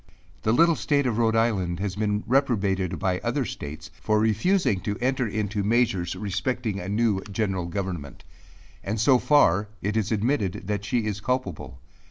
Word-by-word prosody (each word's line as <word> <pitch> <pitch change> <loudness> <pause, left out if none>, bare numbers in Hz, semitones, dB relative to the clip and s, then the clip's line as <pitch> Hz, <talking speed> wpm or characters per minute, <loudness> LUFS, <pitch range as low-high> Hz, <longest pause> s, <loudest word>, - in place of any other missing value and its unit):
The 110 - +1
little 165 +7 +5
state 140 +3 +1
of 120 -2 0
Rhode 115 -1 +2
Island 95 -7 +1
has 95 -1 -2
been 105 0 -1
reprobated 100 -8 +1
by 90 +2 0
other - - -1
states, 75 +1 -7
for 110 0 +2
refusing 110 - +2
to 105 +1 -3
enter 130 0 0
into 105 0 -2
measures 105 -5 +1
respecting 105 +3 -2
a 90 - -5
new 105 -2 +1
general 95 -4 -1
government; 85 -5 -5 0.6
and 110 +3 -2
so 125 +3 +5
far 105 - +4 0.2
it 105 +2 -1
is 110 -1 0
admitted 110 -3 0
that 105 0 -2
she 115 +1 0
is 105 -1 -3
culpable. 105 - -3
105 Hz, 165 wpm, -25 LUFS, 95-120 Hz, 0.6 s, little